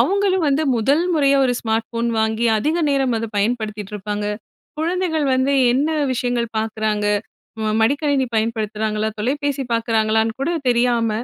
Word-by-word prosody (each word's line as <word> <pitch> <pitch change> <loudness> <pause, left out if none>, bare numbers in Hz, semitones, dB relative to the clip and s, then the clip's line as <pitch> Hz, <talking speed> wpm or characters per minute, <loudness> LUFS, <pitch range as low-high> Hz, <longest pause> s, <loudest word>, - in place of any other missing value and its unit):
அவுங்களும் 385 -2 +2
வந்து 280 +3 +1
முதல் 275 +8 +2
முறையா 280 -2 +3
ஒரு 250 - +2
ஸ்மார்ட் 225 0 -1
ஃபோன் 235 0 -1
வாங்கி 220 +2 0
அதிக 305 +9 0
நேரம் 270 -3 +1
அத 230 - -3
பயன்படுத்திட்டு 210 -1 -2
இருப்பாங்க. 210 +1 -4 0.5
குழந்தைகள் 330 -2 0
வந்து 260 +2 +1 0.2
என்ன 275 +4 +1 0.3
விஷயங்கள் 245 -1 -1
பார்க்குறாங்க? 215 -1 -1 0.6
ம 215 - 0
மடிக்கணினி 280 +1 +1
பயன்படுத்துறாங்களா? 220 -1 -1
தொலைபேசி 280 +3 -1
பார்க்குறாங்களான்னுகூட 225 +4 +1 0.2
தெரியாம, 235 -2 +2
235 Hz, 130 wpm, -20 LUFS, 220-280 Hz, 0.6 s, முறையா